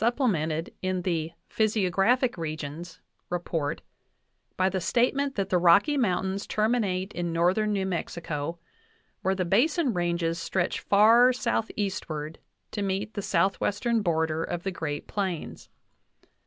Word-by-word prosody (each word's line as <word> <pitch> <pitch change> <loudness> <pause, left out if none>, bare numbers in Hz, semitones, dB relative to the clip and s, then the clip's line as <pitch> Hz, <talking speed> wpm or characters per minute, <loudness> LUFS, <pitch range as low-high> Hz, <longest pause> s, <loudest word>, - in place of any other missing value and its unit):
VIII 235 - +5
plemented 165 - -1
in 185 -1 -1
the 165 -3 -1 0.2
"Physiographic 215 +4 +2
Regions" 160 +1 -6 0.3
by 175 +2 -4
the 190 -1 -1
statement 255 +8 +1
that 195 -1 -1
the 180 - +3
Rocky 180 - +5
Mountains 195 -5 0
terminate 210 -4 0
in 175 -1 -2
northern 180 +6 +2
New 195 -2 0
Mexico, 165 -3 -3 0.6
where 190 +1 +1
the 185 -1 -1
Basin 260 - +2
Ranges 170 -2 -1
stretch 175 +2 -1
far 225 +5 +6
southeastward 195 -10 -3 0.3
to 205 - -3
meet 195 +2 -2
the 205 - -3
southwestern 200 +5 +1
border 160 -3 0
of 175 +1 -4
the 195 - -2
Great 150 -5 -4
Plains. 190 -6 -4
185 Hz, 125 wpm, -27 LUFS, 170-215 Hz, 0.6 s, far